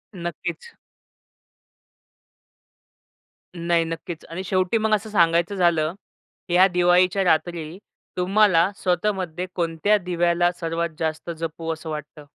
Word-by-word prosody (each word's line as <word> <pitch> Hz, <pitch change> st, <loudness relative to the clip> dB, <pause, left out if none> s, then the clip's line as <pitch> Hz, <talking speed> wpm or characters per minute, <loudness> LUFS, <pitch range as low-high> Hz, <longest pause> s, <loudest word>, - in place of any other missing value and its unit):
नक्कीच. 175 Hz, -, -6 dB, 2.8 s
नाही. 170 Hz, 0 st, +1 dB
नक्कीच 165 Hz, 0 st, -6 dB
आणि 170 Hz, +3 st, -6 dB
शेवटी 185 Hz, +3 st, +1 dB
मग 220 Hz, 0 st, +1 dB
असं 215 Hz, +1 st, -5 dB
सांगायचं 170 Hz, -1 st, +2 dB
झालं. 170 Hz, -3 st, +2 dB, 0.6 s
ह्या 180 Hz, +2 st, +6 dB
दिवाळीच्या 180 Hz, +1 st, +3 dB
रात्री, 165 Hz, -1 st, 0 dB, 0.4 s
तुम्हाला 185 Hz, -1 st, +4 dB
स्वतःमध्ये 180 Hz, -2 st, -1 dB
कोणत्या 170 Hz, +4 st, +1 dB
दिव्याला 175 Hz, -1 st, +1 dB
सर्वात 170 Hz, 0 st, -2 dB
जास्त 160 Hz, +1 st, -3 dB
जपू 165 Hz, 0 st, -4 dB
असं 160 Hz, 0 st, -9 dB
वाटतं? 150 Hz, -1 st, -7 dB
175 Hz, 100 wpm, -23 LUFS, 165-185 Hz, 2.8 s, ह्या